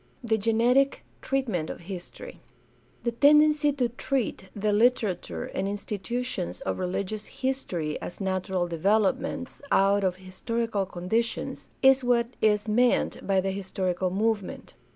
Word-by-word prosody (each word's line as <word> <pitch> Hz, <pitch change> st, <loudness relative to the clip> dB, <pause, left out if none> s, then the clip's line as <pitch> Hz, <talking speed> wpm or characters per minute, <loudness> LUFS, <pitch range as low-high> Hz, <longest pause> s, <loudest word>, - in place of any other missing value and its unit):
The 220 Hz, -2 st, +1 dB
genetic 235 Hz, +6 st, +2 dB, 0.2 s
treatment 225 Hz, -13 st, -1 dB
of -, -, -7 dB
history. 180 Hz, 0 st, -9 dB, 0.3 s
— 120 Hz, -, -35 dB
The 235 Hz, -, 0 dB
tendency 300 Hz, +3 st, +5 dB
to 255 Hz, -3 st, +1 dB
treat 240 Hz, -5 st, -2 dB
the 210 Hz, +1 st, 0 dB
Kterature 205 Hz, -, +1 dB
and 190 Hz, -, -1 dB
institutions 205 Hz, -, -3 dB
of 95 Hz, -, -3 dB
religious 200 Hz, +3 st, -3 dB
history 185 Hz, -, -3 dB
as -, -, -7 dB
natural 190 Hz, -2 st, -1 dB
developments 200 Hz, +8 st, 0 dB
out 200 Hz, +1 st, +4 dB
of 185 Hz, -2 st, +1 dB
historical 200 Hz, +2 st, -3 dB
conditions 205 Hz, +6 st, -2 dB, 0.2 s
is 265 Hz, 0 st, +6 dB
what 240 Hz, -1 st, +2 dB
is 210 Hz, 0 st, +3 dB
meant 240 Hz, +3 st, +2 dB
by 195 Hz, -1 st, +3 dB
the 195 Hz, +1 st, -1 dB
historical 190 Hz, -1 st, -2 dB
movement. 205 Hz, +1 st, -2 dB
205 Hz, 130 wpm, -27 LUFS, 185-240 Hz, 0.3 s, is